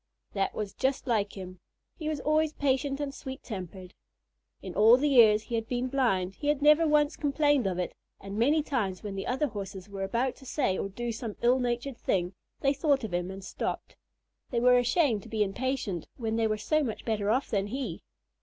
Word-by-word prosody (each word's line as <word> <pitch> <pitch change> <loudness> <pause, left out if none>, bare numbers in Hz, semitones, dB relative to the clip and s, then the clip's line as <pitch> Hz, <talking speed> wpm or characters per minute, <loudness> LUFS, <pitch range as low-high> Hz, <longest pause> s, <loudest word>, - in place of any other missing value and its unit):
That 195 -1 -1
was 210 -2 -4
just 265 0 -1
like 215 -5 0
him. 185 -1 -8 0.4
He 310 -2 -4
was 305 -2 -2
always 310 0 +2
patient 275 0 0
and 285 -2 -3
sweet 265 -1 -8
tempered. 185 -3 -7 0.7
In 185 - -6
all 225 +5 +7
the 290 +3 +1
years 220 -6 +6
he 240 - -9
had 225 -1 -1
been 250 +1 -1
blind, 195 -9 +1
he 290 - -6
had 295 -1 +2
never 300 +2 +5
once 300 0 +3
complained 290 -4 +2
of 185 -2 -2
it, 180 - -2 0.3
and 195 0 -7
many 290 +8 +3
times 210 -11 -2
when 205 -2 -4
the 195 0 -4
other 265 +4 +1
Horses 195 -3 -7
were 200 -1 -6
about 235 +6 0
to 270 - -15
say 255 -9 0
or 195 - -3
do 240 +4 -4
some 225 -1 -5
ill 250 +2 +4
natured 245 +1 -2
thing, 180 0 0 0.3
they 275 0 +3
thought 280 -2 +1
of 215 -5 -5
him 175 +1 -1
and 195 0 -8
stopped. 185 - -4 0.5
They 240 - 0
were 250 +1 +5
ashamed 245 - +2
to 225 - -13
be 215 -1 +1
impatient 205 - -2
when 225 -2 -2
they 225 -1 +2
were 215 0 0
so 310 +9 +1
much 225 -6 -4
better 210 -3 0
off 255 +5 +1
than 200 -2 0
he. 260 +5 -4
235 Hz, 210 wpm, -29 LUFS, 200-275 Hz, 0.7 s, all